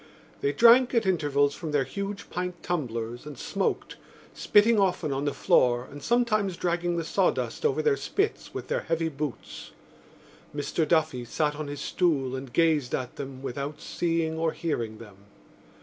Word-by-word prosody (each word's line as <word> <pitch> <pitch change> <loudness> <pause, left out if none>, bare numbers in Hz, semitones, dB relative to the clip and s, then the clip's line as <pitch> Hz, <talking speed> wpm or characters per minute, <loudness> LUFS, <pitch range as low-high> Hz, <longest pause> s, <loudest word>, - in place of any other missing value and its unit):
They 140 - +1
drank 240 - +6
at 230 - +3
intervals 145 -6 +2
from 160 -4 -6
their 145 -2 +3
huge 200 +8 -6
pint 180 0 -4
tumblers 120 -6 -3
and 145 -3 -8
smoked, 195 +9 -2 0.4
spitting 215 +1 +4
often 180 -6 +1
on 135 +2 -2
the 145 - +1
floor 120 0 +3
and 145 +1 -9
sometimes 215 -6 +1
dragging 175 0 0
the 165 - -1
sawdust 460 - 0
over 435 - -1
their 445 -2 +3
spits 405 +1 -2
with - - -6
their - - -1
heavy 165 0 -1
boots. 145 -4 -6 0.9
Mr 150 +2 -1
Duffy 155 -6 +1
sat 150 +5 -1
on 150 0 -5
his 145 0 -6
stool 140 -8 0
and 130 -1 -7
gazed 155 -4 +2
at 125 -1 -5
them, 135 -1 -7
without 140 +3 -4
seeing 165 -2 -1
or 165 -1 +1
hearing 115 -10 -3
them. 105 -4 -13
155 Hz, 165 wpm, -27 LUFS, 135-180 Hz, 0.9 s, drank